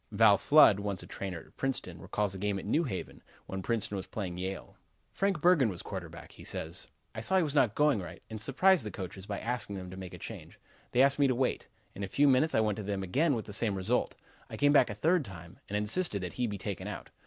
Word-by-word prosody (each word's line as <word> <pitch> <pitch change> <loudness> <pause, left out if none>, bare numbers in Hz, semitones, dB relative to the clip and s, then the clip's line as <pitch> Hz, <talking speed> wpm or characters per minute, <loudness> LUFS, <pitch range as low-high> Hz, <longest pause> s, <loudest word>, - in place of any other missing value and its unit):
Val 105 -1 +6
Flood, 125 -4 +6
once 100 -2 -3
a - - -10
trainer 95 -3 -5
at - - -21
Princeton, 125 -10 -2
recalls 100 0 -1
a 95 - -7
game 100 0 -1
at - - -6
New 155 +11 +1
Haven, 95 -9 -5 0.2
when 95 0 -5
Princeton 105 -1 0
was 95 - -6
playing 95 -5 -4
Yale: 95 +1 -5 0.4
"Frank 195 -5 0
Bergen 165 -9 +5
was 90 -3 -6
quarterback," 85 -4 -7
he - - -13
says. - - -4 0.3
"I 110 - -5
saw 190 +11 +1
he 185 - +4
was 150 -3 -1
not 125 -8 +3
going 150 -8 +3
right, 90 - -8
and 110 -1 -7
surprised 175 - +3
the 105 - -4
coaches 95 0 -7
by 100 - -3
asking 110 -4 -2
them 90 -1 -7
to 95 - -8
make 95 -1 -7
a - - -9
change. - - -9 0.3
They 125 - +5
asked 140 +1 +3
me 140 - +5
to 130 - +1
wait. 130 +1 -1 0.3
In 100 - -6
a - - -2
few 145 +9 +3
minutes 135 +4 +3
I - - +4
went 105 -2 0
to 105 - -4
them 100 -1 -2
again, 140 - +2
with 110 - -4
the 105 - -8
same 105 -1 +2
result. 100 +6 0 0.3
I - - -7
came 145 0 +4
back 135 -4 +5
a 105 - -4
third 165 - +2
time, 90 -6 -11
and 105 - -1
insisted 105 - 0
that 90 - -5
he 125 -1 -1
be 105 -2 -4
taken 100 -2 -5
out. - - -7
105 Hz, 255 wpm, -31 LUFS, 95-135 Hz, 0.4 s, Val